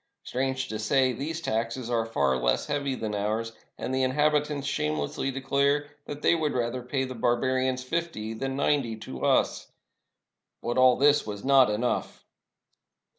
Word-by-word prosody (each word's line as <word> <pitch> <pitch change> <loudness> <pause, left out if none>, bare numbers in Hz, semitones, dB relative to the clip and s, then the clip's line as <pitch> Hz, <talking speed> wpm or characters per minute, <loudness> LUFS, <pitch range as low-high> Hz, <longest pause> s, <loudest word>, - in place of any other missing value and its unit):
Strange 130 +1 -2
to 110 -3 -5
say, 130 +3 +2
these 155 +7 -4
taxes 115 -1 -2
are 115 -2 0
far 70 -11 +1
less 60 -1 +1
heavy 140 -2 -1
than 110 -3 -4
ours, 110 +3 -1 0.3
and 130 - -4
the 130 - +1
inhabitants 150 +1 +1
shamelessly 75 - -1
de 135 0 -4
clare 140 +2 +1 0.2
that 145 0 -7
they - - +5
would 155 -3 0
rather 125 0 -1
pay 130 +2 -2
the 130 -1 -4
barbarians 130 +2 0
fifty 130 -7 -3
than 135 +4 -3
ninety 140 -5 +1
to 65 -12 -8
us. - - +2 1.0
But 120 +2 0
all 130 -1 +6
this 145 -3 +4
was 105 -1 -6
not 135 -3 +6
enough. 110 +4 -2
130 Hz, 160 wpm, -27 LUFS, 115-140 Hz, 1.0 s, all